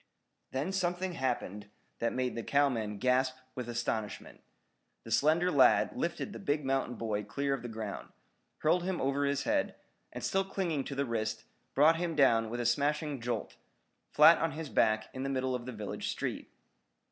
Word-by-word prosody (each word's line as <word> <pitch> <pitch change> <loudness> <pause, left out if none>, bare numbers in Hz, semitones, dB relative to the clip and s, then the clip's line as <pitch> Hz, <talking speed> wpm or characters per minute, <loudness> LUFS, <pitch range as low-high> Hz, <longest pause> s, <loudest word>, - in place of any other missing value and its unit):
Then 140 +8 -2
something 180 -1 -1
happened 120 - -3 0.3
that 115 - 0
made 125 -1 -1
the 115 - -3
cowmen 115 -6 +1
gasp 130 +3 +2 0.2
with 125 -2 -5
astonishment. 115 -3 -3 0.6
The - - -10
slender 165 +5 +3
lad 140 -5 +5
lifted - - -3
the - - -7
big 145 0 -1
mountain 135 -2 0
boy 110 -2 -2
clear 140 +5 -1
of 135 - -3
the 120 - -6
ground, 110 -3 -6 0.5
hurled 175 +3 +2
him 180 0 -2
over 140 +1 +1
his 140 0 0
head, 290 0 0 0.4
and - - -7
still 195 0 +1
clinging 180 -7 -2
to 140 - -5
the 140 +1 0
wrist, 110 -2 -2 0.3
brought 155 +4 +6
him 170 -1 -2
down 115 -6 +4
with 120 +2 -4
a 120 - -1
smashing 145 +2 0
jolt, 120 +1 -3 0.5
flat - - +7
on 165 -2 0
his 155 -1 -6
back 110 -2 +2
in 130 - -5
the 135 - -2
middle 130 -1 -1
of 125 -1 -4
the - - -3
village 105 -4 -5
street. - - -4
135 Hz, 180 wpm, -31 LUFS, 115-150 Hz, 0.6 s, flat